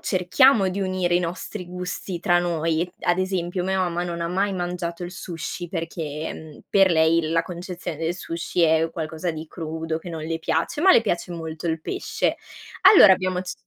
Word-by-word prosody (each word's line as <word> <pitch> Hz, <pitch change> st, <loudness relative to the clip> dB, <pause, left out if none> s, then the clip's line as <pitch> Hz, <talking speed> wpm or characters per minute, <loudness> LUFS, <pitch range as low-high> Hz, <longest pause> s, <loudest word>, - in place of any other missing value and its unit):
cerchiamo 195 Hz, +4 st, +4 dB
di 190 Hz, +2 st, -3 dB
unire 185 Hz, -2 st, 0 dB
i 175 Hz, -, +3 dB
nostri 180 Hz, +2 st, -5 dB
gusti 180 Hz, 0 st, -5 dB
tra 175 Hz, 0 st, +3 dB
noi, 165 Hz, 0 st, -1 dB
ad 175 Hz, 0 st, +2 dB
esempio, 185 Hz, -1 st, -2 dB
mia 190 Hz, +1 st, 0 dB
mamma 175 Hz, -1 st, 0 dB
non 170 Hz, -1 st, -4 dB
ha 170 Hz, -, -2 dB
mai 195 Hz, +3 st, 0 dB
mangiato 175 Hz, -1 st, -4 dB
il 175 Hz, -, -7 dB
sushi 175 Hz, -1 st, -6 dB
perché, 160 Hz, -3 st, -4 dB
mhmm, 155 Hz, -2 st, -11 dB
per 195 Hz, -1 st, +4 dB
lei 160 Hz, 0 st, +3 dB
la 165 Hz, 0 st, +2 dB
concezione 175 Hz, -1 st, -6 dB
del 165 Hz, +2 st, -2 dB
sushi 170 Hz, 0 st, -3 dB
è 160 Hz, 0 st, +3 dB
qualcosa 160 Hz, +1 st, -3 dB
di 160 Hz, 0 st, -7 dB
crudo 160 Hz, 0 st, -4 dB
che 175 Hz, -, -10 dB
non 160 Hz, -2 st, -5 dB
le 165 Hz, 0 st, -3 dB
piace, 160 Hz, -, -1 dB
ma 375 Hz, +3 st, +6 dB
le -, -, +7 dB
piace 180 Hz, -5 st, -2 dB
molto 160 Hz, -1 st, -5 dB
il 160 Hz, 0 st, -1 dB
pesce. -, -, -2 dB, 0.5 s
Allora 210 Hz, -, +9 dB
abbiamo 185 Hz, -1 st, 0 dB
c 185 Hz, 0 st, -5 dB
175 Hz, 190 wpm, -23 LUFS, 165-185 Hz, 0.5 s, Allora